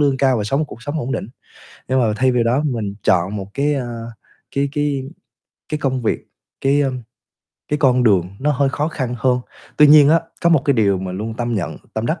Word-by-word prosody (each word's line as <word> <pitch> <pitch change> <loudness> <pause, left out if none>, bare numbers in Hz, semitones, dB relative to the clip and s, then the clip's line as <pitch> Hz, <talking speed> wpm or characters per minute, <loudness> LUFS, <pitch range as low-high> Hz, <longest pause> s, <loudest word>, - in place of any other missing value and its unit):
lương 140 -2 +3
cao 130 -2 +2
và 105 - -2
sống 135 +8 0
một - - +1
cuộc 120 - -11
sống 145 +4 -3
ổn 130 +1 -3
định, 100 - -3 0.6
nhưng 130 +1 +2
mà 110 -3 +1
thay 130 +3 +2
vì 120 -1 +2
đó 120 +5 +2
mình 110 -8 -2
chọn 95 +3 +2
một 95 -2 -5
cái, 145 +2 +1
ơ, 120 -4 -4 0.5
cái 140 0 +1
cái 145 -2 -1 0.7
cái 150 - -1
công 130 -3 -1
việc, 115 - -2 0.3
cái, 140 +1 +3
ơm, 130 -2 -2 0.7
cái 150 - 0
con 125 -3 +3
đường 95 -6 +3
nó 150 +3 +1
hơi 140 +1 +1
khó 145 +3 -1
khăn 130 -6 -3
hơn. 125 +2 +2 0.4
Tuy 150 - +7
nhiên 145 -1 +8
á, 165 +2 +5 0.2
có 170 - +4
một 155 -5 +4
cái 140 - +3
điều 100 -4 +2
mình 95 0 -5
luôn 110 +2 -4
tâm 120 0 -2
nhận, 95 -5 -3 0.2
tâm 110 +1 -2
đắc, 160 +3 -1
130 Hz, 230 wpm, -19 LUFS, 115-145 Hz, 0.7 s, nhiên